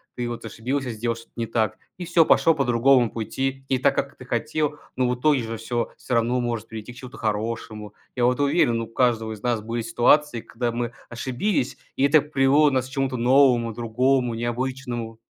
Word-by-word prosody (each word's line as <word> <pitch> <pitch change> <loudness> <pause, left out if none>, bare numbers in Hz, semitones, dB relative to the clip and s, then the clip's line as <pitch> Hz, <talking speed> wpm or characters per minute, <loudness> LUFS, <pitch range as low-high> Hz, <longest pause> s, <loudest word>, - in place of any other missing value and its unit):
Ты 120 -1 -3
вот 120 -1 -6
ошибился, 125 +4 -3
сделал 115 +1 -2
что-то 115 - -14
не 115 - -1
так, 110 -1 0 0.2
и 180 - -6
всё, 170 -1 +4
пошел 165 - +4
по 140 -3 0
другому 120 0 +4
пути. 135 +4 -3
Не 130 - +2
так, 140 - +2
как 140 - -3
ты 125 - -11
хотел, 150 +5 -1 0.2
но 125 -1 +2
в 125 - 0
итоге 140 +1 +2
же 115 0 -4
всё 115 +2 -3
всё 125 - -5
равно 120 +2 +1
может 115 -2 -3
прийти 110 +1 -8
к 120 - -14
чему-то 125 0 -10
хорошему. 110 -1 -3 0.2
Я 120 - +3
вот 125 +3 +2
уверен, 120 -5 +2
у 115 - -5
каждого 115 -2 +1
из 105 -2 -8
нас 120 -3 0
были 115 +2 -3
ситуации, 120 +2 +2
когда 120 0 -3
мы 120 0 -2 0.2
ошибились, 130 - -2 0.2
и - - 0
это 145 +2 +6
привело 145 0 +3
нас 130 -1 -1
к - - -17
чему-то 135 -2 -1
новому, 120 -2 +4
другому, 120 +2 +1
необычному. 120 -1 -3
120 Hz, 200 wpm, -24 LUFS, 115-135 Hz, 0.2 s, это